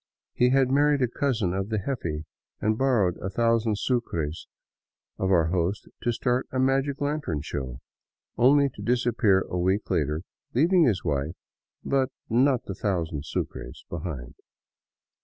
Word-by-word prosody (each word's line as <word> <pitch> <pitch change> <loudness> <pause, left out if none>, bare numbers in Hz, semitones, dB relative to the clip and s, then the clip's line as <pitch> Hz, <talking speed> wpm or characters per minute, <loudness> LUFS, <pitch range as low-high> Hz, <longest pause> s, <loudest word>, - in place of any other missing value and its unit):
He 125 - +3
had 130 0 +3
married 145 0 +3
a - - +3
cousin 120 - 0
of 95 +2 -2
the 110 - 0
jefe 85 - -3 0.4
and 110 +1 +1
bor 130 -2 +2
rowed 90 -1 -1
a 95 - -1
thousand 115 +1 +2
sucres 85 - -2 0.7
of 95 - 0
our 85 -3 +4
host 90 +3 -1
to 120 - +1
start 125 +2 0
a 130 - -3
magic 135 +1 +1
lantern 145 - -1
show, 65 -5 -5 0.5
only 140 +3 +5
to - - -11
disappear 120 -5 +2
a 90 - -3
week 95 +4 0
later 75 +2 0 0.3
leaving 170 +5 +5
his 105 -9 +1
wife, 75 +1 -1 0.5
but 135 -1 +2 0.2
not 130 +2 +3
the 95 - -5
thousand 85 -7 -2
sucres, 65 -3 -5
behind. 75 -8 -5
110 Hz, 150 wpm, -26 LUFS, 85-130 Hz, 0.7 s, only